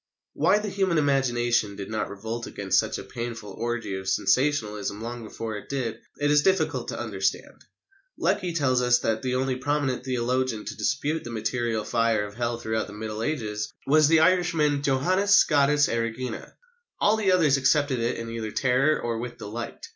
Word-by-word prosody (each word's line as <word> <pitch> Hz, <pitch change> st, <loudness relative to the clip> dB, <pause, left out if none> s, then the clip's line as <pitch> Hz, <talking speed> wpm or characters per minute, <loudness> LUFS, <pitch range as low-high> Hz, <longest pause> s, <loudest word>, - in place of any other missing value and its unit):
'" -, -, -64 dB
Why -, -, +3 dB
the 210 Hz, 0 st, -3 dB
human 190 Hz, -3 st, 0 dB
imagination 120 Hz, -7 st, +1 dB
did 100 Hz, +1 st, -7 dB
not 110 Hz, -, -2 dB
revolt 110 Hz, +4 st, -5 dB
against 95 Hz, -2 st, +1 dB
such -, -, -1 dB
a -, -, -7 dB
painful 115 Hz, -4 st, -6 dB
orgy 115 Hz, 0 st, -3 dB
of 95 Hz, 0 st, -4 dB
sensationalism 105 Hz, -1 st, +1 dB
long 120 Hz, +1 st, -6 dB
before 110 Hz, 0 st, -6 dB
it -, -, -11 dB
did, 120 Hz, -5 st, -3 dB, 0.2 s
it 145 Hz, 0 st, +1 dB
is 150 Hz, 0 st, +5 dB
difficult 190 Hz, -2 st, +1 dB
to -, -, -4 dB
understand. -, -, -3 dB, 0.5 s
Lecky 180 Hz, -, 0 dB
tells 135 Hz, -6 st, +1 dB
us 125 Hz, -1 st, +4 dB
that 110 Hz, -2 st, -1 dB
the 125 Hz, -1 st, -1 dB
only 130 Hz, 0 st, 0 dB
prominent 140 Hz, -1 st, -1 dB
theologian 125 Hz, -2 st, -1 dB
to -, -, -5 dB
dispute 150 Hz, +3 st, -1 dB
the -, -, -7 dB
material 115 Hz, 0 st, -2 dB
fire 115 Hz, -3 st, +1 dB
of 100 Hz, -, -9 dB
Hell 120 Hz, +1 st, -2 dB
throughout 110 Hz, -1 st, -2 dB
the -, -, -10 dB
Middle 110 Hz, +1 st, -5 dB
Ages 110 Hz, -6 st, -2 dB
was 155 Hz, +1 st, +5 dB
the 160 Hz, 0 st, +5 dB
Irishman 165 Hz, -5 st, +2 dB
Johannes 185 Hz, +9 st, +3 dB
Scotus 145 Hz, -1 st, +4 dB
Erigena. 115 Hz, +1 st, -3 dB, 0.5 s
All 210 Hz, -, +4 dB
the 210 Hz, -4 st, +2 dB
others 155 Hz, -7 st, +4 dB
accepted 140 Hz, -1 st, +2 dB
it 115 Hz, +1 st, -1 dB
either 115 Hz, -1 st, -4 dB
in 105 Hz, -, -8 dB
terror 135 Hz, +4 st, +2 dB
or 115 Hz, -1 st, -2 dB
with 120 Hz, 0 st, -6 dB
delight. 115 Hz, +3 st, -7 dB
125 Hz, 180 wpm, -26 LUFS, 110-145 Hz, 0.5 s, is